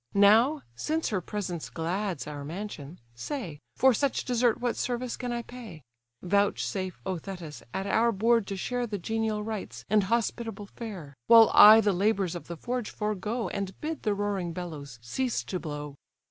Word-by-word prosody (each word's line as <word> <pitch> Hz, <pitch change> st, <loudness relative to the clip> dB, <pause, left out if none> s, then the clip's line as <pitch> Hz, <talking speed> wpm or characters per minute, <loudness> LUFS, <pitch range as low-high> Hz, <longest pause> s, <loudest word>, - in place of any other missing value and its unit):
Now, 225 Hz, +9 st, +5 dB
since 315 Hz, -, -1 dB
her 200 Hz, -5 st, -1 dB
presence 180 Hz, -4 st, -4 dB
glads 175 Hz, 0 st, -2 dB
our 145 Hz, -1 st, -6 dB
mansion, 170 Hz, -1 st, -7 dB
say, 165 Hz, -, -5 dB, 0.2 s
For 265 Hz, 0 st, +5 dB
such 275 Hz, +3 st, 0 dB
desert 245 Hz, -1 st, +2 dB
what 245 Hz, -1 st, -1 dB
service 245 Hz, 0 st, -2 dB
can 245 Hz, -1 st, -4 dB
I 240 Hz, 0 st, -2 dB
pay? 225 Hz, -, -10 dB, 0.4 s
Vouchsafe, 190 Hz, -1 st, 0 dB
O 185 Hz, -2 st, -2 dB
Thetis! 175 Hz, -4 st, -8 dB
at 190 Hz, -, -3 dB
our 230 Hz, +3 st, +3 dB
board 230 Hz, 0 st, +2 dB
to 195 Hz, -, -4 dB
share 245 Hz, +4 st, -2 dB
The 210 Hz, -2 st, -3 dB
genial 220 Hz, +2 st, -1 dB
rites, 215 Hz, -2 st, -6 dB
and 210 Hz, -2 st, +4 dB
hospitable 225 Hz, -1 st, -1 dB
fare; 195 Hz, -10 st, -8 dB
While 225 Hz, -1 st, +8 dB
I 215 Hz, +2 st, +10 dB
the 205 Hz, -2 st, +2 dB
labours 195 Hz, -1 st, +1 dB
of 175 Hz, -, -7 dB
the 170 Hz, -, -6 dB
forge 245 Hz, +3 st, -3 dB
forego, 215 Hz, +3 st, -2 dB
And 195 Hz, -2 st, -4 dB
bid 315 Hz, 0 st, -4 dB
the 210 Hz, -2 st, 0 dB
roaring 200 Hz, -4 st, -2 dB
bellows 150 Hz, -8 st, -7 dB
cease 245 Hz, -, -1 dB
to 185 Hz, -, -4 dB
blow." 150 Hz, -3 st, -6 dB
205 Hz, 170 wpm, -28 LUFS, 180-235 Hz, 0.4 s, I